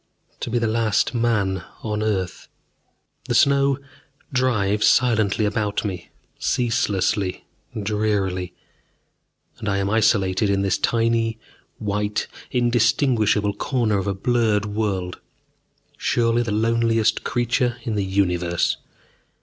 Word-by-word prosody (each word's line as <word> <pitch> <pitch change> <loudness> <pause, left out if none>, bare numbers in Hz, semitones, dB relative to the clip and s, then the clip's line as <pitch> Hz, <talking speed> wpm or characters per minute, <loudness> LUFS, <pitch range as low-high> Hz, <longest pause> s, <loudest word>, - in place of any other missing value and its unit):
To - - -4
be 120 - 0
the 115 - +1
last 110 0 +1
man 105 -6 0 0.2
on 105 -1 -2
earth.... 95 -4 -2 0.8
The 120 - -1
snow 140 +1 +4 0.6
drives 105 -5 +2
silently 110 -4 +3
about 105 0 -1
me, 90 -4 -5 0.3
ceaselessly, 105 -5 0 0.3
drearily. 100 -4 -1 1.0
And 105 - -3
I 100 - +1
am 100 0 -1
isolated 105 -3 +2
in 100 0 +1
this 95 -2 +1
tiny 115 -1 +1 0.4
white, 105 0 -2 0.2
indistinguishable 120 -3 +2
corner 115 -2 0
of 95 - -3
a 100 - -1
blurred 110 0 +1
world, 100 -4 -2 0.8
surely 115 0 +1
the 115 -3 -2
loneliest 115 0 +1
creature 120 0 0
in 115 - -2
the 105 -1 0
universe. 90 -3 0
110 Hz, 110 wpm, -22 LUFS, 100-115 Hz, 1.0 s, snow